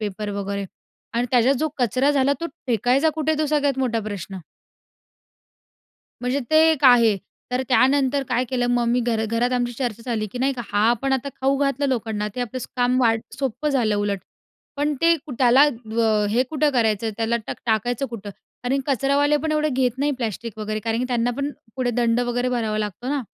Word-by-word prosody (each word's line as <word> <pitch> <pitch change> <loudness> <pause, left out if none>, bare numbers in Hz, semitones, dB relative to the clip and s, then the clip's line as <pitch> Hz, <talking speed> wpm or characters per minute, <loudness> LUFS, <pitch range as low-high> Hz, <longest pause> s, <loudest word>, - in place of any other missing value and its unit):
Paper 210 0 -4
वगैरे 200 0 -3 0.5
आणि 240 +1 +1
त्याच्या 250 +1 +4
जो 310 +4 0
कचरा 255 +4 +2
झाला 280 -1 +2
तो 335 - -2 0.2
फेकायचा 250 +6 +2
कुठे 315 0 0
आहे? 305 - -2
तो 310 - +1
सगळ्यात 285 -2 +1
मोठा 235 -4 0
प्रश्न. 200 -2 -6 1.8
म्हणजे 250 +3 -1
ते 315 - +4
एक 295 -3 -1
आहे. 235 -4 +6 0.3
तर 250 +1 0
त्यानंतर 270 +1 +3
काय 250 - +1
केलं 245 -1 -1
मग 240 -1 +2
मी 245 +1 +2
घरा 230 -2 0
घरात 230 +3 0
आमची 245 -1 0
चर्चा 235 -2 -4
झाली 215 -2 -1
की 250 - -5
नाही 270 +2 +1
का 245 -2 -5
हा 205 - +1
आपण 265 +3 0
आता 265 +1 -1
खाऊ 270 +1 +2
घातलं 280 0 0
लोकांना 220 -4 -2
आता 210 -1 -5
ते 250 - -4
आपलं 245 +1 -3 0.2
काम 250 +1 +2
वा 230 -3 +4 0.3
सोप्पं 270 +2 -2
झालं 240 -7 +1
उलट. 205 -1 -1 0.6
पण 295 +1 0
ते 335 0 +5
कु 300 -2 -10
त्याला 255 +2 +6 0.3
व 220 -2 +2
हे 235 +4 +3
कुठं 300 -1 +2
करायचं, 225 -3 +1
त्याला 230 +1 0
टा - - -3
टाकायचं 240 +4 0
कुठं? 215 -4 -7 0.3
आणि 260 +3 +1
कचरावाले 280 +2 +2
पण 310 +2 -2
एवढे 305 0 +1
घेत 255 -2 0
नाही 290 +1 +1
प्लास्टिक 230 -3 -5
वगैरे 215 0 -3
कारण 225 +1 -1
की 250 - 0
त्यांना 245 -1 +1
पण 280 +1 -2 0.3
पुढे 250 -2 0
दंड 235 0 +1
वगैरे 245 +1 -1
भरावा 225 -4 -1
लागतो 210 +3 -4
ना. 285 0 0
245 Hz, 200 wpm, -22 LUFS, 225-275 Hz, 1.8 s, आहे